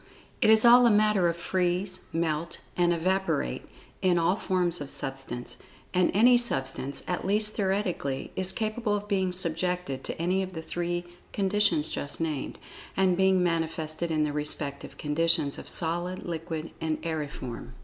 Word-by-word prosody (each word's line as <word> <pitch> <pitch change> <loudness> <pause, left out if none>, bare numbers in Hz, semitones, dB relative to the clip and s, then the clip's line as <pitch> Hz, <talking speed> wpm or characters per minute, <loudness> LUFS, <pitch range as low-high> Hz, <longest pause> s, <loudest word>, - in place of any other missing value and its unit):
It - - +5
is 220 +1 +7
all 245 +1 +8
a - - +6
matter 210 -4 +4
of 170 - -3
"freeze," 185 +1 -1
"melt," 165 0 -1 0.2
and 175 -1 +3
"evaporate," 190 +3 -1 0.3
in 180 -2 +3
all 170 +3 +3
forms 180 -5 0
of 140 - -5
Substance—and 135 +7 -3
any 245 +4 +6
substance, 140 - -1
at 180 - -2
least 210 +2 +2
theoretically, 190 -9 -1
is 190 0 0
capable 215 +1 -1
of 205 0 -4
being 190 -3 +1
subjected 180 -4 -2
to - - -5
any 180 +3 +1
of 190 -1 -5
the 160 - -5
three 175 +1 -2 0.3
conditions 195 -6 +2
just 145 - -3
named, 155 -4 -3 0.4
and 190 -2 +3
being 190 0 +3
manifested 165 -1 -1
in 155 -1 +1
the 150 -1 -1
respective 150 -1 -3
conditions, 150 -1 +1
of - - -7
Solid, 175 +2 -1
Liquid, 165 -1 -4
and 160 -1 -1
Aeriform. 140 -7 -5
175 Hz, 150 wpm, -28 LUFS, 160-190 Hz, 0.4 s, all